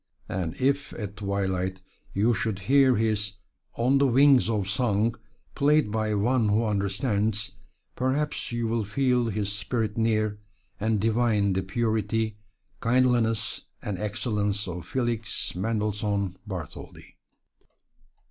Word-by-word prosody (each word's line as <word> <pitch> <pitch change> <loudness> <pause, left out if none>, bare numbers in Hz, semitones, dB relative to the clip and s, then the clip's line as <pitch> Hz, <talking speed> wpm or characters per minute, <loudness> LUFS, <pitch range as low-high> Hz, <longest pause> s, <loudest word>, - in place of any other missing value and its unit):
And 90 -3 -3
if 140 +2 +1
at 105 -2 -6
twilight 95 -2 -1 0.3
you 110 +5 +2
should 110 -3 -1
hear 135 -1 +5
his 105 -1 0 0.4
"On 130 +4 +3
the 140 - +4
Wings 135 -1 +5
of 105 -4 0
Song," 110 +1 +1 0.4
played 145 -5 +3
by 110 -1 0
one 115 +2 +2
who 110 +3 +2
understands, 105 0 0 0.4
perhaps 135 +3 -1
you 120 -1 -1
will 115 0 0
feel 125 +3 +1
his 105 -2 -1
spirit 110 +1 -2
near, 110 -2 +1 0.4
and 110 0 +1
divine 110 -2 +2
the 95 - 0
purity, 110 +1 -1 0.4
kindliness 115 -3 +2 0.2
and 100 -3 -3
excellence 105 -1 -1
of 90 -1 -6
Felix 115 -2 -1
Mendelssohn 105 -1 -1
Bartholdy. 90 -7 -8
110 Hz, 120 wpm, -26 LUFS, 100-120 Hz, 0.4 s, hear